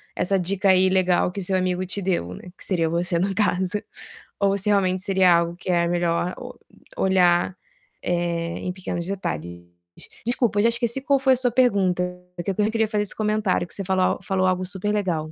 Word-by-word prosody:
essa 195 +1 +1
dica 195 +2 0
aí 185 0 +5
legal 185 -1 +2
que 200 - -4
seu 190 +1 0
amigo 185 0 -1
te 195 +2 -4
deu", 175 - -1
né, - - -11
que - - -13
seria 165 -4 0
você, 170 +1 0
no 195 +2 -1
caso. 190 -1 0 0.6
Ou 200 0 +2
se 200 +2 -2
realmente 190 -2 +2
seria 190 -2 +4
algo 170 0 0
que 185 - -8
é 170 -1 +2
melhor 175 +1 0
o - - -8 0.4
olhar, 180 -1 +3 0.5
eh, 170 -1 -1
em 180 - -3
pequenos 180 -2 -4
detalhes. 85 - -5 0.3
De - - -12 0.2
desculpa, 235 -3 +1
eu 205 - +3
já 230 - +5
esqueci 235 +2 -2
qual 280 -1 +2
foi 265 0 +4
a - - +3
sua 245 -1 +1
pergunta. 200 -8 +2 0.3
É 175 - -4
que 195 - -1
eu 190 - -5
queria 220 +1 +1
fazer 210 -1 0
esse 205 - -4
comentário, 210 -4 0
que - - -13
você 200 - -3
falou 185 -1 +2
al - - -1
falou 185 0 +1
algo 185 0 0
super 195 +3 -3
legal. 170 -7 -1
185 Hz, 210 wpm, -23 LUFS, 175-205 Hz, 0.6 s, aí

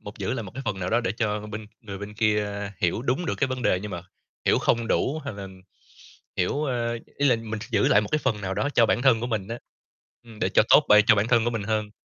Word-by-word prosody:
một 105 - -10
giữ 115 - -2
lại 125 - -3
một 100 - -9
cái 135 - -5
phần 95 -2 -2
nào 90 - -2
đó - - +3
để 100 -5 -1
cho 105 -2 -1
bên 105 0 -7
người 100 -4 -8
bên 105 +1 -8
kia 105 -1 +1 0.3
hiểu 90 +6 0
đúng 135 +7 -1
được - - -1
cái 145 - +2
vấn 130 -1 -4
đề, 90 - +2
nhưng 105 0 -6
mà 85 - -5 0.4
hiểu - - +3
không 115 0 +1
đủ 145 +4 +1
hay 140 - -5
là 100 -1 -7 0.9
hiểu, 140 +12 0
a 120 -4 -1 0.3
ý 145 - +3
là 120 - +4
mình 110 -1 -6
sẽ 110 - -9
giữ - - +3
lại 100 - +5
một 105 - -5
cái 155 - +3
phần 125 -8 -1
nào 95 -1 -3
đó 145 - 0
cho 115 - +5
bản 120 - +1
thân 130 -4 +4
của 120 - -2
mình 105 -5 -3
á, 115 +1 -5 0.7
ừm, 115 -2 -14
để - - +1
cho - - +4
tốt - - +7
b - - +6
cho - - +7
bản 105 +2 0
thân 115 -2 +3
của 120 - +1
mình 115 -3 -3
hơn. 105 0 -1
110 Hz, 285 wpm, -25 LUFS, 105-120 Hz, 0.9 s, tốt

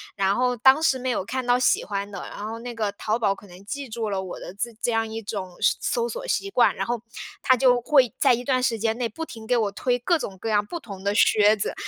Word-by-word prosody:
然 195 0 +1
后 250 0 +1
当 265 +6 +5
时 315 -5 +3
没 255 0 -3
有 215 - -1
看 255 +5 -4
到 245 0 +3
喜 250 - +3
欢 200 0 -3
的， 195 -3 -7
然 205 - -8
后 225 +1 -5
那 245 +1 -6
个 215 -3 -1
淘 215 +3 -2
宝 200 -4 +1
可 205 - -15
能 180 +1 -14
记 280 +4 -5
住 220 -1 -3
了 195 -1 -1
我 185 -2 -7
的 - - -8
自 235 +4 -4
这 240 - +1
样 225 0 0
一 225 +1 -5
种 190 -4 -6
是 - - +4
搜 475 0 0
索 - - -6
习 395 - -1
惯， 245 -11 +3
然 - - -2
后 240 -1 -2 0.4
它 260 -2 +5
就 250 -1 +4
会 265 -3 +4
在 265 -3 +5
一 245 +1 -2
段 255 -1 +1
时 230 -3 0
间 225 +1 0
内 245 -1 -1
不 230 +9 -7
停 225 -7 -10
给 245 - +2
我 215 -4 +1
推 245 +4 0
各 345 +8 +2
种 200 -10 -6
各 225 - -4
样 205 -1 +2
不 345 - -6
同 200 - -10
的 200 - +1
靴 210 0 +5
子。 200 - -3
230 Hz, 300 characters per minute, -24 LUFS, 205-255 Hz, 0.4 s, 当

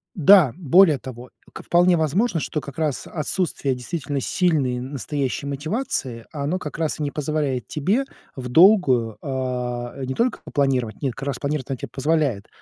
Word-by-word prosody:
Да, 180 -4 +6
более 175 -1 +5
того, 125 0 -9 0.2
к - - -9
вполне 175 +1 +4
возможно, 165 - +1
что 150 - -2
как 140 -2 -10
раз 155 -4 -2
отсутствие 155 -3 -2
действительно 140 +2 -4
сильной 140 -5 +1
настоящей 140 +1 -3
мотивации, 140 - -3
оно 150 +5 -2
как 150 -4 -7
раз 160 -1 -2
и - - -2
не 145 - -2
позволяет 145 -4 -2
тебе 195 - 0 0.3
вдолгую, 130 - +4
а, 125 -2 -3
не 130 0 -3
только 235 - 0
попланировать, 130 -6 -1
нет, 135 -5 -2
как 135 +2 -6
раз 140 - -2
планировать 145 -1 -3
она 135 - -2
тебе - - -6
позволяет. 140 -7 0
140 Hz, 155 wpm, -22 LUFS, 130-160 Hz, 0.3 s, Да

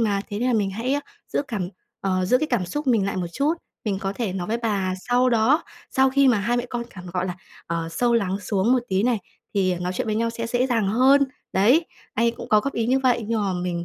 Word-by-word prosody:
mà, 205 -3 +1
thế 205 - -3
nên 250 +3 +1
là - - +2
mình 205 -3 +1
hãy, 230 +7 -1
a, 290 - 0 0.3
giữ - - +1
cảm 190 -6 -2 0.3
ờ, 185 -1 0
giữ 250 +7 +3
cái 310 - 0
cảm 240 - 0
xúc 295 +11 -4
mình 220 -6 +3
lại 200 - -2
một 180 -1 -1
chút. 290 - +1 0.3
Mình 200 -3 -1
có 195 -2 -2
thể 215 -4 -2
nói 180 -2 -3
với 230 - +1
bà 200 -5 -1
sau 250 +1 +4
đó, 240 +8 +3 0.3
sau 265 0 +3
khi 275 0 +4
mà 240 -4 +4
hai 235 +5 0
mẹ 245 - -1
con 240 -1 -2
cảm 185 -2 -10
gọi 185 0 -1
là, 180 0 -4 0.3
ờ, 165 -1 -2
sâu 240 +6 +1
lắng 195 -4 +1
xuống 200 +3 +1
một 260 - +4
tí 190 +1 +1
này, 235 -1 +2 0.4
thì 185 -2 +2
nói 180 +1 -3
chuyện 185 - -2
với 215 - 0
nhau 230 +1 +1
sẽ 230 0 -4
dễ 245 +2 +1
dàng 225 -6 +1
hơn." 265 +6 +5 0.3
Đấy, 245 - +4 0.3
anh 230 - +2
ấy 235 - +4
cũng - - -9
có 215 - +5
góp 275 +5 -3
ý 230 -1 0
như 260 +2 +3
vậy, 245 -4 +2
nhưng 225 -1 +1
mà 200 -2 0
mình 175 -1 -2
225 Hz, 275 wpm, -24 LUFS, 190-245 Hz, 0.4 s, hơn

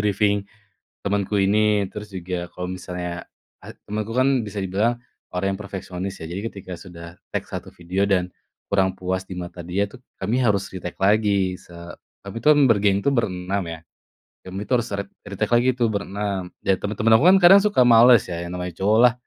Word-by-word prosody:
briefing 105 0 +2 0.7
temenku 100 0 -1
ini, 105 0 +3
terus 105 0 -8
juga 90 -1 -4
kalau 90 - -5
misalnya, 90 -1 -6 0.4
eee, - - -10
temenku 105 +2 -3
kan 130 +2 +3 0.2
bisa 105 0 -6
dibilang 105 +6 0 0.4
orang 95 +2 0
yang 105 - -15
perfeksionis, 95 -1 -6
ya - - -5
jadi 95 +3 -4
ketika 95 -2 -10
sudah 85 -3 -11 0.3
take - - -2
1 - - -6
video 90 +3 -1
dan 90 -2 +1 0.4
kurang 95 -1 +2
puas 95 0 -2
di - - -10
mata 85 0 -7
dia 100 +3 0
tuh, 130 - -13 0.2
kami 105 +6 0
harus 100 -4 +1
retake 90 -2 -7
lagi 100 -2 +2
se 85 - -18 0.5
tapi 100 +3 -6
itu - - -11
kan 145 -1 +5
bergeng 100 -2 +3
itu, - - +1
berenam 95 -4 -1
ya, 80 - -6 0.7
kami 95 +1 -6
itu - - -3
harus 120 -1 -1
re 100 - -2 0.2
retake - - -2
lagi 120 +2 +3
tuh 120 -2 +3
berenam, 100 -2 -3
dan 95 - +3
temen-temen 105 +2 +1
aku 145 - +1
kan 195 - +7
kadang 195 +3 +9
suka 210 -9 +2
males 120 -1 +7
ya, 85 -1 -4
yang 85 - -6
namanya 90 -1 -5
cowok 105 +3 +3
lah, 120 - -2
100 Hz, 190 wpm, -23 LUFS, 90-105 Hz, 0.7 s, kadang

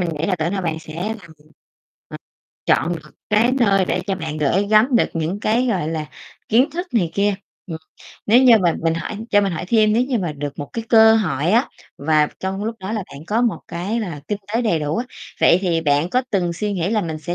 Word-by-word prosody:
mình 175 - -1
nghĩ 160 - -1
là 190 - +1
tưởng 160 0 -1
đâu 190 -2 -2
bạn 160 -2 -2
sẽ 155 -1 -11
làm 220 +1 -3
ờ, 165 - -15 1.3
chọn - - +2
được 150 -1 -14 0.2
cái 225 +4 +3
nơi 200 -7 +3
để - - -1
cho 195 - 0
bạn 160 -4 -5
gửi 170 +7 +1
gắm 225 +4 +5
được - - +2
những 165 +5 -2
cái, 235 +4 +1
gọi 185 -10 -1
là, 155 -2 -3 0.4
kiến 255 +7 +3
thức 350 +5 -4
này 180 -8 +1
kia. 200 0 +1 0.3
Ừm. 160 -4 -6 0.5
Nếu 235 +5 +5
như 240 -4 +7
mà 175 -3 +2
mình 165 0 +1
hỏi 165 +5 -5
cho 205 - +5
mình 195 -3 -1
hỏi 170 - -4
thêm 215 -2 +3
nếu 235 +3 +3
như 255 -3 -1
mà 175 -5 -2
được 145 -1 -5
một 145 - -4
cái 230 -1 -4
cơ 220 -1 +7
hội 165 -7 0
á, 235 +5 +3 0.3
và 150 0 +2
trong 190 +2 -3
lúc 225 +1 -3
đó 190 +2 -5
là 215 -3 -2
bạn 145 +3 -10
có 220 +5 0
một 235 -3 0
cái 185 +7 -3
là 170 -9 -5
kinh 210 - -2 0.2
tế 235 - +2
đầy 195 -8 +1
đủ 150 +1 -2
á, 240 - -1 0.4
vậy 175 - +5
thì 170 -3 +1
bạn 145 +2 +1
có 255 +4 +2
từng 175 -4 0
suy 205 +4 -3
nghĩ 185 0 -1
là 220 - +1
mình 160 -4 -4
sẽ 175 +3 -4
190 Hz, 245 wpm, -20 LUFS, 160-220 Hz, 1.3 s, như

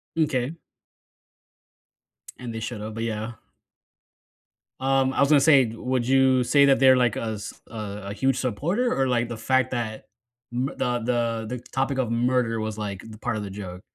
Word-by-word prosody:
M'kay. 140 -4 0 1.8
And 120 -2 -7
they 115 - -4
should've, 110 -1 -5
but 115 +1 -4
yeah. 110 0 -3 1.5
Um, 135 0 +2
I - - -3
was 140 - +5
gonna 150 -2 +6
say, 140 -2 +6
would 120 +2 -2
you 130 -1 +4
say 140 +3 +5
that 135 -1 +4
they're 130 -1 +7
like 125 -3 +2
a 110 -1 -2
s 105 - -6 0.2
a 105 -2 -6
a - - -4
huge 130 +5 +1
supporter, 160 - 0
or, 135 0 +2
like, 120 -1 +1
the 120 - -5
fact 130 +2 +1
m 115 -3 -2 0.8
the 125 -1 0
the 115 -1 -1
the 125 +1 -4
topic 135 +1 0
of 130 -4 0
murder 120 -1 +1
was, 110 -1 -4
like, 100 -3 -5 0.2
part - - -1
of 105 - -3
the 100 - -6
joke? 95 -2 -8
120 Hz, 170 wpm, -25 LUFS, 110-130 Hz, 1.8 s, they're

